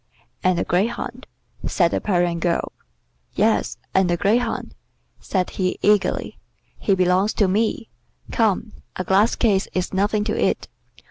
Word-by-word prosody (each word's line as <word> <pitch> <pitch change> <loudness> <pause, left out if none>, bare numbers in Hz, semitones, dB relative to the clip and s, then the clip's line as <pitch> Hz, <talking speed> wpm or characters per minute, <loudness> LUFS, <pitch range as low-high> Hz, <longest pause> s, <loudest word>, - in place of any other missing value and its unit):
"And 185 -1 +3
the - - +1
greyhound," 235 +6 -2 0.4
said 170 -3 +2
the - - -1
Parian 175 -4 +1
girl. 170 0 0 0.6
"Yes, 215 +2 +1 0.2
and 190 -2 +3
the 175 - +1
greyhound," 225 +7 0 0.5
said 185 -2 -1
he 185 -1 -1
eagerly. 210 -1 +1 0.4
"He 195 - +2
belongs 185 +3 +2
to 205 - +3
me. 220 +4 0 0.4
Come, 215 -1 +1 0.2
a 185 - -2
glass 195 +5 +3
case 200 -5 +2
is 185 +1 -2
nothing 205 +2 +1
to - - -2
it. - - 0
195 Hz, 140 wpm, -22 LUFS, 180-215 Hz, 0.6 s, And